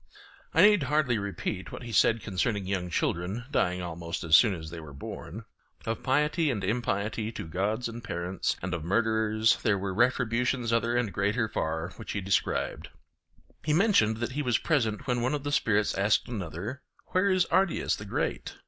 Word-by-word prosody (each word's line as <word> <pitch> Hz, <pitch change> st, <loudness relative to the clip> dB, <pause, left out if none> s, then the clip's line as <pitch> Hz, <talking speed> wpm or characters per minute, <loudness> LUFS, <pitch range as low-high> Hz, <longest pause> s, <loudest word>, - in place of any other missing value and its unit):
I 165 Hz, -, +5 dB
need 210 Hz, -1 st, +6 dB
hardly 140 Hz, -4 st, +1 dB
repeat 100 Hz, -1 st, -4 dB
what -, -, -7 dB
he 120 Hz, -, -7 dB
said 115 Hz, +1 st, +3 dB
concerning 100 Hz, +1 st, -1 dB
young 95 Hz, -2 st, -2 dB
children 90 Hz, +7 st, -1 dB
dying 90 Hz, -9 st, +1 dB
almost 85 Hz, 0 st, -5 dB
as 80 Hz, -1 st, +5 dB
soon 105 Hz, -6 st, +6 dB
as 80 Hz, -2 st, -8 dB
they 85 Hz, -, -7 dB
were 75 Hz, -3 st, -10 dB
born. 70 Hz, -, -8 dB, 0.4 s
Of 115 Hz, 0 st, -2 dB
piety 150 Hz, +4 st, +2 dB
and 105 Hz, -7 st, -2 dB
impiety 105 Hz, 0 st, -1 dB
to -, -, -6 dB
gods 105 Hz, +8 st, -1 dB
and 115 Hz, +1 st, -8 dB
parents, 90 Hz, -2 st, -2 dB
and 90 Hz, 0 st, -2 dB
of 85 Hz, -3 st, -3 dB
murderers, 110 Hz, +3 st, +2 dB
there 100 Hz, -2 st, +2 dB
were 95 Hz, 0 st, -3 dB
retributions 120 Hz, +1 st, +1 dB
other 115 Hz, +1 st, +1 dB
and 115 Hz, -6 st, -1 dB
greater 100 Hz, +5 st, +1 dB
far 80 Hz, -2 st, -2 dB
which 115 Hz, -, -6 dB
he 100 Hz, -, -2 dB
described. 95 Hz, +1 st, -1 dB, 0.7 s
He 150 Hz, -, +1 dB
mentioned 155 Hz, -, +3 dB
that 120 Hz, +2 st, -3 dB
he 145 Hz, +3 st, -2 dB
was 125 Hz, -5 st, +2 dB
present 115 Hz, -10 st, 0 dB
when 125 Hz, -2 st, 0 dB
one 130 Hz, +5 st, +1 dB
of 145 Hz, -, -5 dB
the 145 Hz, -, -2 dB
spirits 105 Hz, -6 st, +2 dB
asked 100 Hz, +2 st, +2 dB
another, 105 Hz, -, -5 dB, 0.3 s
'Where 190 Hz, +2 st, +3 dB
is 185 Hz, -2 st, +3 dB
Ardiaeus 190 Hz, -2 st, +2 dB
the 105 Hz, -, -9 dB
Great? 100 Hz, -, -3 dB
110 Hz, 185 wpm, -28 LUFS, 95-125 Hz, 0.7 s, need